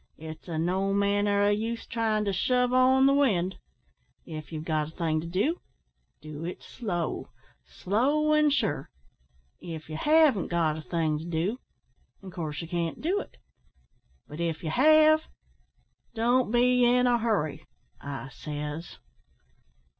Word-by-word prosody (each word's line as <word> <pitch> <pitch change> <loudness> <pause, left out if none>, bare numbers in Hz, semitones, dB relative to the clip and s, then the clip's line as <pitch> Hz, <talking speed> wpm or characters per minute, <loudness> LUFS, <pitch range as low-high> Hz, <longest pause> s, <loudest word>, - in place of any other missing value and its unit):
It's 160 +2 -10
o' 165 - -3
no 190 +4 0
manner 200 0 +2
o' 205 - +4
use 225 +2 -2
tryin' 220 -2 0
to 200 - 0
shove 250 +5 +1
on 260 +1 +5
the 275 - +5
wind. 195 -10 +1 0.7
If 155 -2 -8
ye've 155 -1 -6
got 155 -2 0
a 160 - -13
thing 160 -3 0
to 165 - -7
do, 205 - -1 0.6
do 155 0 -8
it 175 +2 -6
slow 175 -9 -4 0.4
slow 285 +10 +1
an' 305 0 +4
sure. 230 - -1 0.7
If 160 -3 -8
ye 155 - -5
haven't 300 - +4
got 165 -3 +1
a 160 - -6
thing 155 -2 -1
to 160 - -8
do, 175 +8 -2 0.6
in 190 - -9
coorse 160 -2 -5
ye - - -7
can't 170 -1 -3
do 365 +6 0
it, - - -10 0.9
but 150 - -9
if 165 -1 -2
ye 160 - -2
have, 310 - +5 0.9
don't 240 +2 +2
be 245 +1 +3
in 250 +1 +4
a 240 -1 +3
hurry 210 -10 -1 0.3
I 135 -1 -6
says." 150 +4 -6
195 Hz, 150 wpm, -27 LUFS, 160-250 Hz, 0.9 s, on